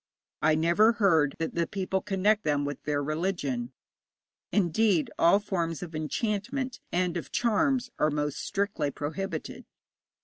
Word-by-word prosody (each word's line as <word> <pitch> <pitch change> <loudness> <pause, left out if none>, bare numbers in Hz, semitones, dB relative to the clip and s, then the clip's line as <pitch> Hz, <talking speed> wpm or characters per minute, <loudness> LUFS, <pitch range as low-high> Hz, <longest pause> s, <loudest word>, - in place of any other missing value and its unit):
I 155 0 +4
never 170 +8 +4
heard 165 -10 +3
that 165 - -3
the 170 -1 0
people 190 -1 -2
connect 205 +1 +1
them 145 -2 +1
with 145 -2 -5
their 145 -1 0
religion. 145 -6 -2 0.8
Indeed, 195 -2 +2
all 170 +4 +6
forms 175 -5 -2
of 170 -2 -8
enchantment 210 - -2
and 180 -1 0
of 170 - -6
charms 245 +2 +1
are 150 - +3
most 150 -1 -2
strictly 200 -7 -1
prohibited. 160 +4 -5
175 Hz, 135 wpm, -28 LUFS, 155-205 Hz, 0.8 s, all